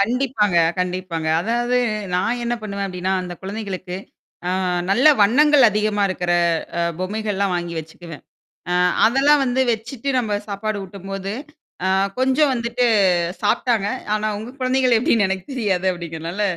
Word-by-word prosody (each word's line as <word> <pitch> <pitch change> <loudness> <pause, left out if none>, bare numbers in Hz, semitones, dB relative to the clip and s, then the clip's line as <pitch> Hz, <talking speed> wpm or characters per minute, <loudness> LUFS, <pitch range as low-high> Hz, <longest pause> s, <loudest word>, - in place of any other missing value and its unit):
கண்டிப்பாங்க, 225 -3 +1 0.2
கண்டிப்பாங்க. 180 -3 -2
அதாவது 240 +5 0 0.4
நான் 230 +7 0
என்ன 240 0 0
பண்ணுவேன் 200 -2 -3
அப்பிடின்னா, 185 0 -3
அந்தக் 180 -1 -8
குழந்தைகளுக்கு 190 -3 -5 0.5
அ - - +1 0.4
நல்ல 245 +9 +3
வண்ணங்கள் 270 +5 +5
அதிகமா 210 0 0
இருக்கிற 180 -1 -1 0.5
அ - - +1 0.2
பொம்மைகள்லாம் 200 0 -1
வாங்கி 175 -1 -3
வச்சுக்குவேன். 160 0 -11 0.5
அ - - +1 0.3
அதெல்லாம் 275 +4 +4
வந்து 255 +1 0
வச்சிட்டு 230 +4 -4
நம்ம 215 -4 0
சாப்பாடு 210 +1 -3
ஊட்டும் 195 0 -11
போது, 195 0 -4 0.5
அ - - +2 0.3
கொஞ்சம் 265 +2 +3
வந்துட்டு 235 +1 -1 0.6
சாப்பிட்டாங்க. 210 -1 +1 0.3
ஆனா, 215 - -2
உங்க 235 +4 -8
குழந்தைங்க 255 -1 +3
எப்பிடின்னு 230 -6 +3
எனக்குத் 190 +7 -4
தெரியாது 190 -7 0
அப்பிடிங்கிறனால 170 +2 -5
210 Hz, 135 wpm, -21 LUFS, 185-245 Hz, 0.6 s, வண்ணங்கள்